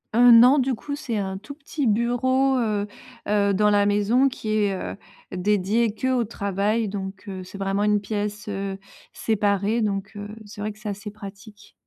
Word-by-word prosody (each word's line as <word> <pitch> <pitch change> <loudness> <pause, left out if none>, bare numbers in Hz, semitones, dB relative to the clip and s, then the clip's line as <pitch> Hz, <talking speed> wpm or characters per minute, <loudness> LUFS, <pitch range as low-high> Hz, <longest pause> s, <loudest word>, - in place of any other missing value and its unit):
Heu, 245 +1 +7
non, 245 +4 +8
du 265 -1 +1
coup, 285 +5 -5
c'est 245 -6 -3
un 190 -1 -3
tout 215 +9 -9
petit 290 0 -4
bureau, 250 +4 +2
heu 210 -4 0 0.4
heu, 200 -1 +2
dans 210 +2 +3
la 205 -1 +3
maison, 210 +6 +3
qui 235 -4 -5
est, 210 -2 +2
heu, 190 - -5 0.4
dédié 205 +4 +1
qu'au 255 +1 0
travail. 205 +1 -1
Donc, 195 0 -6
heu, 190 -2 -6
c'est 190 +2 -10
vraiment 195 +1 0
une 210 -1 +2
pièce, 210 +1 -4
heu, 195 -1 -4 0.3
séparée. 210 +1 0
Donc, 200 -1 -2
heu, 205 0 -6 0.2
c'est 205 0 -10
vrai 215 +1 -2
que 210 - -16
c'est 215 -1 -5
assez 200 +1 -6
pratique. 205 +1 -12
210 Hz, 180 wpm, -24 LUFS, 200-230 Hz, 0.4 s, non